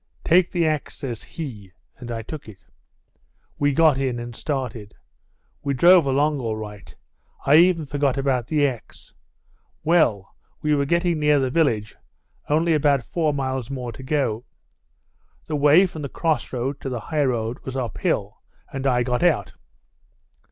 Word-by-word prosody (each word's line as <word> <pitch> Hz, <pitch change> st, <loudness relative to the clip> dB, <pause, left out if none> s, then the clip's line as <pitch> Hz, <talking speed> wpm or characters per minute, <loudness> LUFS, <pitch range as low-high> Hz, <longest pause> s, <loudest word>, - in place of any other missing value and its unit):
"'Take 175 Hz, +1 st, +4 dB
the 170 Hz, -2 st, 0 dB
axe,' 155 Hz, -2 st, -1 dB
says 120 Hz, -5 st, -5 dB
he, 115 Hz, -, -8 dB, 0.3 s
and 120 Hz, -, -8 dB
I 115 Hz, -1 st, -4 dB
took 145 Hz, 0 st, -8 dB
it. 100 Hz, -, -12 dB, 1.0 s
We 145 Hz, 0 st, +3 dB
got 150 Hz, -1 st, +4 dB
in 130 Hz, -3 st, -1 dB
and 120 Hz, 0 st, -7 dB
started. 125 Hz, -8 st, -4 dB, 0.7 s
We 140 Hz, -1 st, -1 dB
drove 175 Hz, +2 st, +6 dB
along 145 Hz, +2 st, +1 dB
all 110 Hz, -2 st, -2 dB
right; 105 Hz, -2 st, -9 dB, 0.5 s
I 145 Hz, +2 st, +6 dB
even 170 Hz, -2 st, +4 dB
forgot 140 Hz, -1 st, 0 dB
about 130 Hz, -3 st, 0 dB
the 150 Hz, -2 st, +2 dB
axe. 120 Hz, -5 st, -9 dB, 0.7 s
Well, 125 Hz, -, +2 dB, 0.3 s
we 150 Hz, 0 st, +2 dB
were 140 Hz, -1 st, +2 dB
getting 170 Hz, +1 st, +1 dB
near 150 Hz, -1 st, +4 dB
the 130 Hz, -2 st, 0 dB
village; 120 Hz, -10 st, 0 dB, 0.5 s
only 160 Hz, +3 st, +2 dB
about 145 Hz, -4 st, +2 dB
four 160 Hz, -3 st, 0 dB
miles 130 Hz, -4 st, -3 dB
more 125 Hz, -3 st, -4 dB
to 115 Hz, -, -11 dB
go. 130 Hz, -5 st, -1 dB, 1.0 s
The 155 Hz, -, -3 dB
way 150 Hz, +6 st, +6 dB
from 160 Hz, -4 st, -7 dB
the 140 Hz, -, -4 dB
cross 160 Hz, +1 st, -1 dB
road 130 Hz, +2 st, -3 dB
to 135 Hz, -, -4 dB
the 125 Hz, -2 st, -3 dB
high 150 Hz, -1 st, +3 dB
road 120 Hz, -1 st, -2 dB
was 130 Hz, 0 st, -6 dB
up 120 Hz, -5 st, -4 dB
hill, -, -, -1 dB, 0.3 s
and 135 Hz, 0 st, -2 dB
I 125 Hz, -2 st, +2 dB
got 125 Hz, 0 st, -1 dB
out. 175 Hz, -3 st, +2 dB
140 Hz, 165 wpm, -23 LUFS, 120-155 Hz, 1.0 s, drove